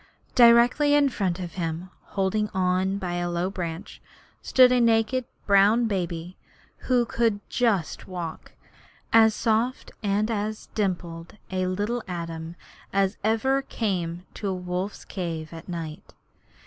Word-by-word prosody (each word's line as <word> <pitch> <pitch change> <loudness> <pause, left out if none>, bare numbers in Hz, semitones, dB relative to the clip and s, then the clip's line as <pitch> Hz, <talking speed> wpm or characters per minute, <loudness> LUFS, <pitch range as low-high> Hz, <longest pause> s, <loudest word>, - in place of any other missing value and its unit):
Directly 245 +5 +6
in 285 -1 +4
front 190 -7 -1
of 175 -2 -6
him, 170 0 -4
holding 205 +2 0
on 185 +1 +1
by 180 -3 -3
a 175 0 -1
low 175 +2 -1
branch, 170 -3 -6 0.4
stood 255 -1 +5
a 250 -1 +4
naked 230 +2 +2 0.2
brown 205 +4 +5
baby 175 -4 -3 0.5
who 245 -2 +4
could 230 -3 +1
just 215 -9 0
walk 175 -3 -6 0.6
as 220 -1 +6
soft 230 +3 0
and 210 +2 0
as 215 0 -3
dimpled 175 -3 -3
a 185 -1 0
little 205 +6 -1
atom 165 -2 -5 0.4
as 195 +1 +1
ever 225 +6 +2
came 180 -9 -3
to 205 - -5
a 190 - -1
wolf's 180 +2 -4
cave 165 -4 -5
at 165 +3 -10
night. 165 -3 -7
195 Hz, 135 wpm, -25 LUFS, 175-225 Hz, 0.6 s, Directly